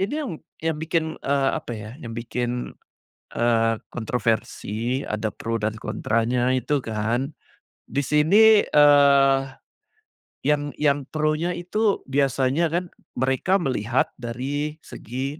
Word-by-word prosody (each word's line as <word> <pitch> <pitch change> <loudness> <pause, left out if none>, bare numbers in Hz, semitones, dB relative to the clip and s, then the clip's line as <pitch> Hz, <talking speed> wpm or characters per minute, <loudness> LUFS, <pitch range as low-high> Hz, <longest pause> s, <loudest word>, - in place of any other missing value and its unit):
ini 200 +9 -1
yang, 300 -9 -3 0.3
yang 160 -1 0
bikin, 160 0 0 0.2
eee, 140 -1 +1
apa 155 -6 -4
ya, 105 0 -8
yang 115 -1 -7
bikin, 120 +1 -3 0.7
eee, 115 -1 +3 0.2
kontroversi, 115 +1 -2
ada 105 0 -2
pro 115 -1 -4
dan 110 +1 -1
kontranya 120 +3 0
itu 135 +2 0
kan. 115 +5 -1 0.6
Di 140 +4 -1
sini, 200 +10 +5
eee, 140 -2 +6 1.1
yang, 145 0 0
yang 145 -2 +1
pronya 155 +3 0
itu 200 +4 0
biasanya 135 +3 +1
kan, 175 +2 -3 0.2
mereka 135 +9 +1
melihat 120 -2 0
dari 140 +6 -3
segi 135 +6 -6
135 Hz, 115 wpm, -24 LUFS, 120-150 Hz, 1.1 s, eee